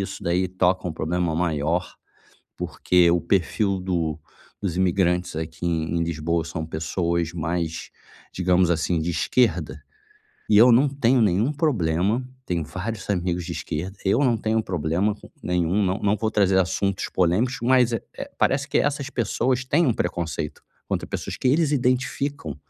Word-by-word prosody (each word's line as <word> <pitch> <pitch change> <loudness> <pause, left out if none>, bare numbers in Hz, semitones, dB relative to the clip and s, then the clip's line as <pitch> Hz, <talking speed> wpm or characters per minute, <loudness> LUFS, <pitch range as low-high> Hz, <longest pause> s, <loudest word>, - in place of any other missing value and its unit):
isso 95 - -6
daí 90 +1 +1
toca 90 0 0
um 85 - -2
problema 85 +1 -1
maior, 80 +1 -1 0.6
porque 90 -1 +2
o 85 - +2
perfil 100 +2 0
do 85 -4 -1 0.4
dos 95 -4 -2
imigrantes 90 -2 +1
aqui 80 +1 -5
em 85 0 0
Lisboa, 85 0 -1
são 80 0 -5
pessoas 85 +1 -1
mais, 85 -1 -3 0.4
digamos 90 -1 +2
assim, 85 0 +1
de 80 - -2
esquerda. 115 +9 +1 0.7
E 105 - +4
eu 120 +4 +8
não 125 +5 +5
tenho 135 -2 +2
nenhum 105 +6 +2
problema, 110 - 0 0.2
tenho 85 -2 -1
vários 95 +5 -5
amigos 90 -2 -1
de - - -7
esquerda, 95 +6 -4
eu 100 +6 +2
não 125 -5 +3
tenho 110 +1 0
um - - +1
problema 90 +4 0
com - - -15
nenhum, 90 +3 +1
não 95 - +1
não - - -11
não - - +1
vou 110 +1 -1
trazer 95 -3 +3
assuntos 100 +1 -1
polêmicos, 95 +9 +1
mas 125 -1 +4
é - - -1 0.2
é - - -7
parece 140 +1 +1
que - - +1
essas 140 -1 -1
pessoas 125 +2 0
têm 150 +6 +2
um 125 - +3
preconceito 85 -6 -3 0.3
contra - - -1
pessoas - - -4
que 130 - 0
eles 150 +2 +2
identificam, 130 - -1
90 Hz, 165 wpm, -24 LUFS, 85-115 Hz, 0.7 s, eu